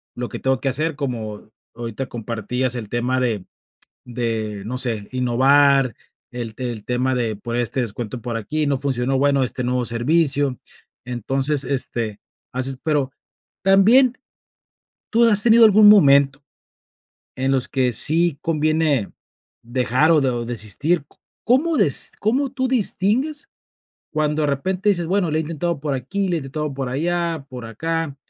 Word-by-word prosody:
lo 120 0 -4
que - - -6
tengo 130 -1 0
que 135 - -1
hacer, 155 +4 -1
como 115 -7 -5 0.2
ahorita 120 +2 -5
compartías 120 +2 -3
el 110 -4 -6
tema 125 +3 -1
de 110 -7 -1 0.6
de, 115 -4 -3
no 125 +4 -4
sé, 115 -5 0
innovar, 130 +1 +3 0.4
el 120 -3 -6
el 120 -4 -5
tema 125 +1 0
de 115 -4 -1
por 115 +3 -5
este 120 +2 -1
descuento 120 +1 -5
por 115 0 -4
aquí, 150 +7 -2
no 140 -1 +1
funcionó 130 -1 -1
bueno 140 0 +2
este 125 0 -2
nuevo 125 0 -1
servicio, 140 +2 +1 0.5
entonces, 135 +4 -1
este, 120 -5 -2 0.3
haces, 130 +1 -2
pero 145 -4 0 0.5
también 225 +7 +5 1.0
tú 235 +1 +4
has 210 -2 +7
tenido 230 0 +7
algún 215 -1 +7
momento 140 -8 +5 1.0
en 135 +1 0
los 130 -2 0
que 130 -3 +1
sí 160 +6 +2
conviene 155 - 0 0.5
dejar 125 +6 +1
o 155 - +4
de 135 - +1
o 120 -1 -3
desistir, 120 - -1 0.4
¿cómo 295 +8 +2
des 170 - +2
cómo 255 +6 0
tú 260 -1 -1
distingues 255 +5 0 0.6
cuando 155 0 0
de - - +2
repente 185 +8 0
dices, 175 -4 -1
bueno, 185 -2 +1
lo 155 - -1
he - - +1
intentado 165 0 -3
por 145 -1 -2
aquí, 190 - -3
lo 180 - 0
he - - -1
intentado 150 +1 -4
por 135 -2 -4
allá, 165 +2 -2
por 125 -2 -8
acá, 160 +5 -3
135 Hz, 155 wpm, -21 LUFS, 120-165 Hz, 1.0 s, has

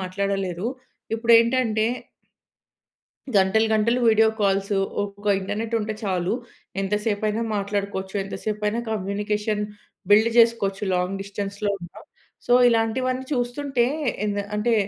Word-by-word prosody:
మాట్లాడలేరు. 190 0 -2 0.5
ఇప్పుడు 230 +1 +2
ఏంటంటే 230 -2 +2 1.5
గంటలు 195 +3 +4
గంటలు 235 +3 +2
వీడియో 220 0 +5
కాల్స్ 195 0 +1 0.3
ఒక 205 0 -7
ఇంటర్నెట్ 220 +4 -3
ఉంటే 215 0 -3
చాలు. 185 -2 0 0.5
ఎంత 195 +1 -1
సేపైనా 215 +1 0
మాట్లాడుకోవచ్చు. 200 -1 -3
ఎంత 195 - -7
సేపైనా 210 +1 -1
కమ్యూనికేషన్ 210 +1 -1 0.5
బిల్డ్ 220 +3 +6
చేసుకోవచ్చు 210 -4 +3
లాంగ్ 180 +2 -1
డిస్టెన్స్‌లో 200 +1 -3
ఉన్న. 175 -2 -10 0.5
సో, 245 - +2 0.2
ఇలాంటివన్నీ 255 +3 0
చూస్తుంటే 245 0 0 0.4
ఎంద 205 -1 -1 0.2
అంటే 230 +2 +2
210 Hz, 110 wpm, -24 LUFS, 195-225 Hz, 1.5 s, బిల్డ్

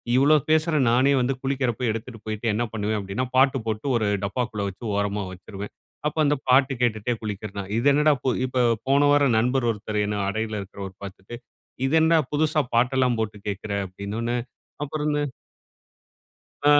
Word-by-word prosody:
இவ்ளோ 145 +4 +6
பேசுறேன் 155 -4 +3
நானே 130 +3 +4
வந்து 130 +2 +1
குளிக்கிறப்ப 130 -3 -1
எடுத்துட்டு 115 +1 -6
போய்ட்டு 110 +1 -3
என்ன 120 +3 0
பண்ணுவேன் 105 0 -1
அப்படின்னா, 100 +6 -3
பாட்டு 135 0 +4
போட்டு 110 +3 -3
ஒரு 110 -2 0 0.2
டப்பாக்குள்ள 105 -2 -2
வச்சு 95 +5 -10
ஓரமா 100 0 -1
வச்சிருவேன். 100 +2 -8 0.3
அப்போ 155 - -3
அந்த 145 +1 +3
பாட்டு 135 +1 +5
கேட்டுட்டே 115 0 +1
குளிக்கிறேன். 100 -2 -5
இது 125 +5 +1
என்னடா 150 +1 +4 0.3
இப்போ 125 0 0 0.3
போன 140 +1 +4
வாரம் 140 -5 +4
நண்பர் 125 +1 +1
ஒருத்தர் 105 0 -4
என்ன 105 0 -2
அடையில 110 +1 -2
இருக்கிறவர் 95 -1 -8
பார்த்துட்டு, 95 +4 -9 0.5
"இது 135 - 0
என்னடா 160 0 +4
புதுசா 155 +1 +2
பாட்டெல்லாம் 125 0 +2
போட்டு 105 -1 -3
கேட்கிற" 100 +1 -5 0.2
அப்படின்னோன்ன 105 +6 -4 0.5
அப்புறம் 150 +1 -2
இந்த 145 0 0 1.5
ஆ. - - +7
120 Hz, 155 wpm, -24 LUFS, 105-135 Hz, 1.5 s, ஆ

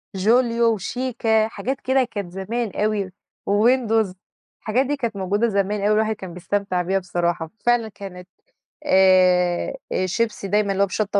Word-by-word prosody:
جوليو 230 +3 +3
وشيكا، 225 +1 0
حاجات 240 +6 -4
كده 260 0 +2
كانت 200 -5 -5
زمان 210 +4 -3
أوي، 210 -2 -1 0.3
وويندوز. 220 -1 +2 0.5
الحاجات 245 +5 +1
دي 290 +2 -1
كانت 235 -6 -3
موجودة 200 +4 0
زمان 200 -1 0
أوي، 210 +1 +2
الواحد 220 0 +1
كان 190 -4 -9
بيستمتع 185 +1 -2
بيها 190 +2 0
بصراحة. 175 -2 -2 0.2
فعلًا 240 -2 +3
كانت 185 -3 -10 0.6
آآ، 185 - +4 0.3
شيبسي 210 +1 -2
دايمًا 205 0 +1
اللي 195 +1 +2
هو - - +1
بشطة 205 +1 0
205 Hz, 145 wpm, -22 LUFS, 190-230 Hz, 0.6 s, آآ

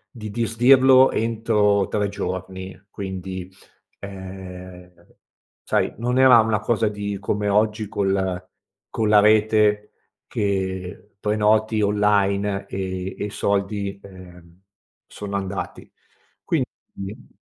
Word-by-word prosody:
di 110 -2 -7
disdirlo 130 +4 +5
entro 110 -3 +1
3 105 -1 -1
giorni, 95 -1 -6
quindi, 95 -1 -6 0.5
ehm, 95 -2 -10 0.7
sai, - - 0
non 125 +2 0
era 130 -2 +8
una 110 -1 0
cosa 110 0 0
di 100 -1 -4
come 105 +1 -2
oggi 105 +1 +1
col 95 -3 -1 0.4
con 110 -2 0
la 105 - +7
rete 105 0 +3 0.4
che 95 0 -3
prenoti 110 +1 +2
online 100 -1 +1
e 95 0 -4
e - - -3
i 105 - -4
soldi, 100 0 -2
ehm, 90 -2 -14 0.5
sono 100 -1 -7
andati, 95 0 -6 1.0
quindi 100 +6 -8
100 Hz, 105 wpm, -22 LUFS, 95-110 Hz, 1.0 s, era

